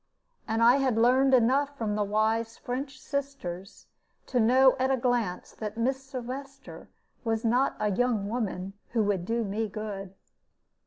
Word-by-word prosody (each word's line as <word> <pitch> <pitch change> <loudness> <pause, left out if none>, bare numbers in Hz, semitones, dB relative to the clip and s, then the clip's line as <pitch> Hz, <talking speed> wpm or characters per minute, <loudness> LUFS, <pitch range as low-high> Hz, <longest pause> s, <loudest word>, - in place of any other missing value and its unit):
And 225 +1 +1
I 240 +3 +7
had 260 -5 +1
learned 260 +3 +5
enough 275 +4 +2
from 220 -4 -1
the 210 0 +1
wise 220 +2 0
French 260 +2 -5
sisters 265 -12 -5 0.4
to 250 - 0
know 255 +3 +5
at 260 +1 +2
a 265 - +2
glance 235 -7 -1
that 215 0 -6
Miss 260 +3 0
Sylvester 270 +1 -8 0.3
was 225 -1 -1
not 250 +4 +2
a 210 - +1
young 225 -1 +1
woman 195 -4 -3 0.2
who 225 -2 +2
would 200 -4 0
do 230 +3 0
me 215 +2 -2
good. 195 -2 -6
230 Hz, 155 wpm, -28 LUFS, 210-260 Hz, 0.4 s, I